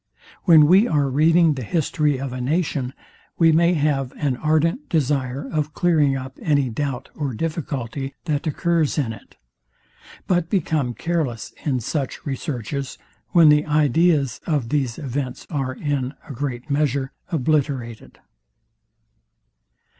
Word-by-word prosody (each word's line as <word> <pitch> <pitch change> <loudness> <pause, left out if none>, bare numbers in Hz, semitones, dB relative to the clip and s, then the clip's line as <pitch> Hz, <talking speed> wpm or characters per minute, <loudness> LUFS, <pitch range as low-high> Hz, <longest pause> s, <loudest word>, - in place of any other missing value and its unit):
When 160 -5 +8
we 190 +8 +5
are 145 -3 +1
reading 160 +3 +4
the 135 - -5
history 150 - 0
of 135 -2 -4
a 125 - -4
nation, 140 -2 -1 0.4
we 165 -1 +5
may 170 +2 +4
have 140 -4 0
an 140 -4 -1
ardent 160 - 0
desire 140 -4 0
of 150 -1 -2
clearing 155 -6 +3
up 130 0 -8
any 140 -5 +1
doubt 135 +1 -3
or 140 -6 -3
difficulty, 140 -3 -4
that 155 -1 -1
occurs 165 0 +1
in 125 -7 0
it; 105 - -15 0.9
but 175 -3 +1
become 155 - 0
careless 150 -7 -2
in 130 -5 0
such 135 +3 -3
researches, 135 -1 -4 0.3
when 165 -3 +6
the 150 +1 +4
ideas 150 -2 +2
of 145 -8 0
these 135 -5 -1
events 135 -3 -4
are, 135 -4 -2
in 140 -2 -2
a 145 - -7
great 125 -1 -4
measure, 140 -2 0 0.2
obliterated. 135 -6 -1
145 Hz, 130 wpm, -22 LUFS, 130-160 Hz, 0.9 s, When